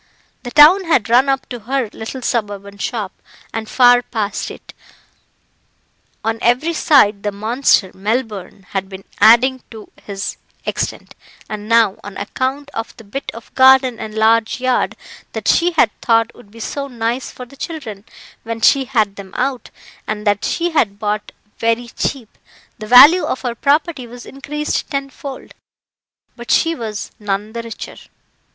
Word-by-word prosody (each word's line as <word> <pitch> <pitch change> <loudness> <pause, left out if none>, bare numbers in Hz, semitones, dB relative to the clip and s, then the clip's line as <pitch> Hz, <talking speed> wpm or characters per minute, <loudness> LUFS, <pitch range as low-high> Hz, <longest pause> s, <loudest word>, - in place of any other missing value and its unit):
The 245 - -7
town 310 +8 +7
had 255 -10 +2
run 255 +3 +5
up 270 0 0
to 245 - -6
her 255 +2 -1
little 245 +3 -7
suburban 200 -4 -3
shop, 210 -3 -3 0.4
and 220 -1 -4
far 245 -1 +5
past 215 -4 -3
it; - - -12 1.5
on 225 0 -1
every 255 +8 +2
side 215 -11 +4
the 205 - -2
monster, 215 -1 +1
Melbourne, 205 -2 -3
had 195 -1 -3
been 190 0 -9 0.2
adding 255 +3 +5
to 220 -2 -12
his 200 -1 -5 0.3
extent, - - -4 0.3
and 215 0 -7
now, 230 -4 +3
on 205 0 -8
account 265 +7 -3
of 225 - -6
the 225 - -12
bit 225 +7 -6
of 230 - -12
garden 260 -2 +5
and 215 0 -7
large 225 +2 +2
yard, 255 0 0 0.4
that - - -5
she 350 0 +3
had 240 -9 +3
thought 230 0 +2
would 240 -4 -17
be 230 +2 -14
so 280 +5 -4
nice 240 0 -3
for 250 - -9
the 250 - -17
children, 265 -10 -7 0.4
when 230 0 -5
she 270 +4 +4
had 215 -5 0
them 195 -2 -10
out, 255 0 -2 0.4
and 210 0 -4
that 205 0 +1
she 345 +1 -1
had 205 -11 +1
bought 210 0 -3 0.3
very 230 +1 0
cheap, 255 -2 -4 0.4
the 215 - -7
value 290 +9 +9
of 265 - -3
her 245 -2 -2
property 285 +1 0
was 245 +1 -11
increased 295 +2 -4
tenfold 275 -1 -6 0.8
but 240 -1 -11
she 330 0 +3
was 220 -7 -5
none 205 +1 -3
the 235 - -4
richer. 230 -2 -8
235 Hz, 160 wpm, -18 LUFS, 215-265 Hz, 1.5 s, value